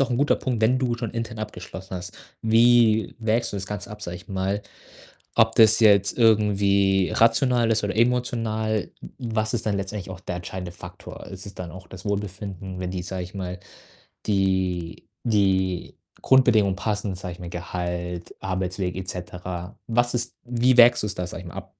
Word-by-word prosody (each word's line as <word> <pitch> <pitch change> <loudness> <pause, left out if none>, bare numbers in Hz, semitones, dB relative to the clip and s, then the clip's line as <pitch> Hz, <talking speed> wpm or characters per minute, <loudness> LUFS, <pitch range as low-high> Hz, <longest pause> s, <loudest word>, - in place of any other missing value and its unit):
auch 135 - 0
'n 120 - +1
guter 145 +2 +3
Punkt, 125 -4 -2
wenn 125 +4 +3
du 125 -2 0
schon 115 -2 -4
intern 115 -1 -4
abgeschlossen 95 -3 -7
hast, 90 0 -7 0.3
wie 115 -2 +4
wägst 115 +1 0
du - - -3
das 95 -1 -4
Ganze 105 -2 -5
ab, 105 0 -9
sage 90 -3 -5
ich 90 +3 -14
mal, 95 +1 -1 0.7
ob 115 0 +4
das 110 0 +7
jetzt 100 -2 +5
irgendwie 100 -4 +3
rational 115 0 +3
ist 110 -1 +1
oder 105 - -2
emotional, 115 -3 0
w - - -10
was 110 -1 -1
ist 115 -1 -2
dann 105 -2 +1
letztendlich 95 -1 -5
auch 95 - -8
der 90 -1 -5
entscheidende 90 0 -6
Faktor? 85 - -10
Ist 95 0 -9
es 100 - -9
dann 90 -2 -7
auch 95 -1 -11
das 95 +2 -11
Wohlbefinden, 100 -2 -4
wenn 90 -1 -3
die 90 -1 -4
sage 90 +1 -4
ich 90 - -12
mal, 90 -1 -5 0.7
die 95 -4 0 0.2
die 95 -5 +1 0.3
Grundbedingungen 110 -7 +4
passen, 105 +1 -2
sage 90 -1 -6
ich 90 - -15
mal, 90 - -6
Gehalt, 90 0 -4
Arbeitsweg 95 -1 -2
et 95 0 -5
cetera. 90 +1 -6
Was 120 +1 +2
ist 120 -1 -2
wie 120 +1 +2
wägst 120 -1 +8
du's 105 -1 -2
da, 90 - -3
sage 90 +1 -6
ich - - -8
mal, 85 - -11
ab? - - -8
100 Hz, 185 wpm, -24 LUFS, 90-115 Hz, 0.7 s, wägst